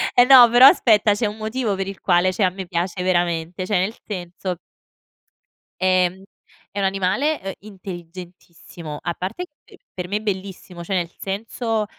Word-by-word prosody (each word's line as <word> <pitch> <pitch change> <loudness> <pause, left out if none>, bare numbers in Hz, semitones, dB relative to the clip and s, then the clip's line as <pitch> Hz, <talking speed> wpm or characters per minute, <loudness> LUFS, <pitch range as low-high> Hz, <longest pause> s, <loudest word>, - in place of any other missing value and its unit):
eh 245 - +7
no 250 -3 +9
però, 250 +3 +9
aspetta, 220 - +4
c'è 220 - -1
un 210 +1 -6
motivo 220 0 -2
per 195 0 -4
il 195 - -7
quale 180 0 +2
cioè 200 - -1
a 185 - +4
me 190 -1 -8
piace 175 +2 -3
veramente. 175 -1 -1
Cioè 190 -1 +1
nel 200 +5 -2
senso 180 -2 -5 1.3
ehm, 185 0 +2 0.5
è 205 - -11
un 195 - +1
animale, 195 +11 0
ehm, 195 +1 -5
intelligentissimo. 175 -4 -10
A 170 - -3
parte 195 - -5 0.2
che - - -18 0.2
per 180 -1 -5
me 205 +3 -1
è - - -6
bellissimo, 190 -3 -6
cioè 190 - -4
nel 175 -2 -1
senso, 220 +2 -3
190 Hz, 170 wpm, -21 LUFS, 180-215 Hz, 1.3 s, no